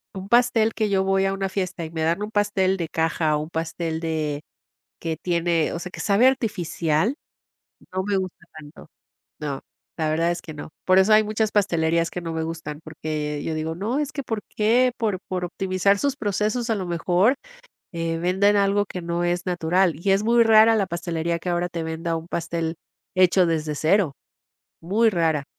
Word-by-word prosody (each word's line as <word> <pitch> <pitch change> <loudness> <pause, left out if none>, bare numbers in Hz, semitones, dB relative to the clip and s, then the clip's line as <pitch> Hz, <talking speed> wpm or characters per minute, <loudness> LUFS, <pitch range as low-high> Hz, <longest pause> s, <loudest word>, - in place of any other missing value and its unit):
un 190 0 -6
pastel 235 -1 +3
que 215 -2 0
yo 195 -1 +2
voy 195 0 +2
a 195 - +1
una 195 0 -2
fiesta 185 -3 -3
y 160 - -9
me 160 -1 -4
dan 165 +5 +1
un 210 - -5
pastel 205 -3 +1
de 165 -3 -3
caja 160 -1 +1
o - - -2
un 155 - -9
pastel 160 0 -3
de 155 -3 -2 0.6
que 165 -1 -3
tiene, 170 -2 +1
o - - -3
sea, 180 +1 -7
que - - -8
sabe 210 +5 +4
artificial. 195 - +1 0.8
No 190 - 0
me 200 0 0
gusta 185 -1 -5
tanto. 150 +1 -13 0.5
No, 145 -3 -4 0.4
la 160 -1 0
verdad 165 +2 +1
es 175 0 -2
que 155 - -9
no. 145 - -8 0.2
Por 185 0 +5
eso 190 +3 +5
hay 215 0 +6
muchas 215 0 -1
pastelerías 170 -4 +2
que 180 - -5
no 165 -1 -4
me 160 0 -2
gustan, 160 -2 -5
porque 155 -2 -4
yo 160 - -2
digo: 155 +1 -3
"No, 215 +9 -2
es 295 -2 -2
que 280 - -4
¿por 225 -4 -3 0.2
qué, 240 +4 +3
por 210 -5 -1
por 180 -1 -2
optimizar 185 +2 +1
sus 280 +2 0
procesos, 215 +2 -1
a 225 - +3
lo 190 -3 -3
mejor, 175 +7 +2 0.6
eh, 165 -1 -2
venden 190 +4 +3
algo 200 0 +3
que 180 - -6
no 170 +1 -1
es 175 +1 0
natural?". 180 0 +1
Y 195 +5 +1
es 195 - +2
muy 235 +1 +4
rara 225 0 +6
la 200 -3 +1
pastelería 170 0 -2
que 180 - -5
ahora 175 0 0
te 170 -2 -4
venda 160 +1 -3
un 165 +1 -7
pastel 165 -1 -3 0.4
hecho 185 0 +5
desde 155 -2 -1
cero, 160 0 +2 0.7
muy 215 +7 +2
rara. 160 -6 +1
175 Hz, 200 wpm, -23 LUFS, 165-205 Hz, 0.8 s, hay